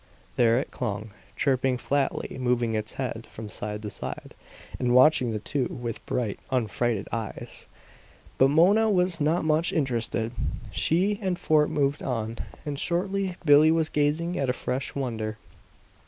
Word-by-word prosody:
There 115 -1 +4
it 135 - -2
clung, 105 +1 -4 0.2
chirping 130 -1 +1
flatly, 140 +2 -1
moving 120 -2 +1
its 110 0 -2
head 120 -4 -4
from 110 -1 -8
side 105 +1 -4
to 105 - -5
side - - -7 0.5
and 125 -1 +2
watching 130 -1 +6
the 110 - -1
two 130 +5 -1
with 120 -3 -5
bright, 115 -5 -2
unfrightened 120 -3 0
eyes. 110 -1 -5 0.7
But 135 - +7
Mona 190 +10 +4
was 180 -4 +2
not 155 +3 +2
much 155 +2 +2
interested; 115 -5 0 0.4
she 175 - +1
and 185 -3 -1
Fort 150 -3 +3
moved 140 0 0
on. 115 -3 -3 0.3
And 145 -2 -3
shortly 190 +1 -1
Billie 150 +1 +7
was 160 -1 +2
gazing 150 +4 0
at 135 -2 0
a - - +2
fresh 130 +1 -3
wonder. 110 -5 -3
130 Hz, 150 wpm, -26 LUFS, 115-155 Hz, 0.7 s, But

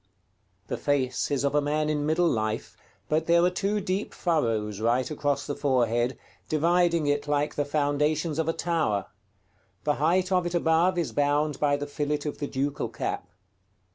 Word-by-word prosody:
The - - -3
face 130 -3 0
is 140 -1 0
of 140 - +1
a 150 - +3
man 150 +1 0
in 150 -1 0
middle 170 +3 +3
life, 110 -6 -2 0.3
but 155 +1 0
there 170 0 +5
are 180 - +3
two 200 +3 0
deep 195 +1 -3
furrows 115 - 0
right 120 +5 +1
across 145 -2 -1
the 145 - -3
forehead, 125 -4 +1 0.3
dividing 170 +1 +2
it 145 0 0
like 145 0 0
the 145 - -1
foundations 150 +2 0
of 160 0 0
a - - +1
tower: 155 - 0 0.8
the 150 -1 +1
height 180 +4 +2
of 180 -2 +2
it 175 - -3
above 170 +2 +3
is 170 -3 -1
bound 145 0 +1
by 145 -1 +2
the 145 - -4
fillet 145 0 -2
of 150 - -4
the 145 - -2
ducal 140 +1 -2
cap. - - -4
150 Hz, 175 wpm, -27 LUFS, 145-165 Hz, 0.8 s, there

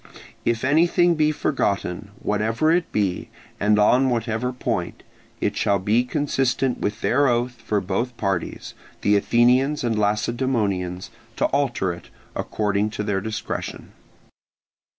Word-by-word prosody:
If 115 -1 0
anything 170 +5 +4
be 155 -1 +2
forgotten, 100 -10 -1
whatever 110 +8 +1
it 170 0 +1
be, 100 -4 -1 0.3
and 105 +1 +3
on 125 +6 +4
whatever 115 0 -1
point, 125 - -3 0.4
it - - -1
shall 100 - +2
be 105 +6 +2
consistent 135 -2 0
with 105 - -3
their 140 +3 +3
oath 120 -1 0
for 105 -2 0
both 115 +6 -2
parties, 95 -4 -3 0.3
the 105 - +3
Athenians 125 +7 +3
and 115 -2 0
Lacedaemonians, 105 -4 -1 0.2
to - - +1
alter 120 -10 0
it, 85 - -12 0.3
according 105 0 -1
to 105 0 -4
their 100 -2 -1
discretion. 110 +2 -5
115 Hz, 130 wpm, -23 LUFS, 105-130 Hz, 0.4 s, anything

